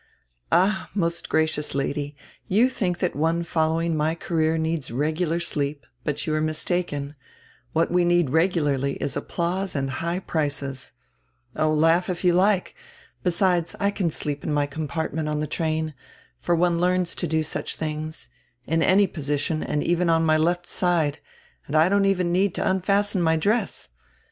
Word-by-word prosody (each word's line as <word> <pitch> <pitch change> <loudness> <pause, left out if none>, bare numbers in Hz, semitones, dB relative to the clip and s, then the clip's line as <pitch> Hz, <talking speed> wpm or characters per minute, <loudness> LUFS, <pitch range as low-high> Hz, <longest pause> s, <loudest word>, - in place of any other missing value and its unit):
"Ah, 190 +1 +2
most 170 -3 0
gracious 155 -2 +1
Lady, 140 +1 -2 0.3
you 225 +7 +4
think 180 -8 -1
that 180 -1 -1
one 165 +3 +1
following 165 0 0
my 155 +1 +1
career 165 -2 0
needs 160 -3 -1
regular 155 +6 0
sleep, 145 -5 -2 0.2
but 145 -1 -2
you 155 - -1
are 155 - +1
mis 155 0 0
taken. 150 -6 -2 0.6
What 165 +1 +1
we 180 0 +3
need 175 -5 +2
regularly 150 -5 +1
is 140 0 -3
applause 180 +2 -2
and 135 -1 -1
high 170 +1 -1
prices. 140 -7 -2 0.6
Oh, 155 0 +2
laugh 165 +4 +3
if 180 0 -3
you 180 -1 +4
like. 190 +1 +2 0.5
Besides, 175 -1 +1
I 200 0 +2
can 190 -4 -1
sleep 145 -2 -3
in - - -2
my 145 -1 +2
compartment 155 +1 -3
on 150 0 -1
the 155 - -1
train 155 0 -2 0.2
— - - -31
for 175 - +1
one 170 0 +2
learns 180 -1 +1
to 175 - -2
do 160 0 +1
such 155 - -4
tilings 155 0 -4 0.2
— 120 0 -43
in 165 +1 +1
any 195 +4 +5
position 150 -2 -2
and 150 0 -1
even 175 0 +1
on 165 0 +3
my 155 0 +4
left 175 +3 +1
side, 165 -6 0 0.5
and 145 - -3
I 160 +3 +5
don't 200 0 +3
even 185 -3 +1
need 190 +1 +2
to - - -1
unfasten 195 +1 +1
my 160 -1 +3
dress. 210 +9 0
165 Hz, 175 wpm, -24 LUFS, 150-180 Hz, 0.6 s, any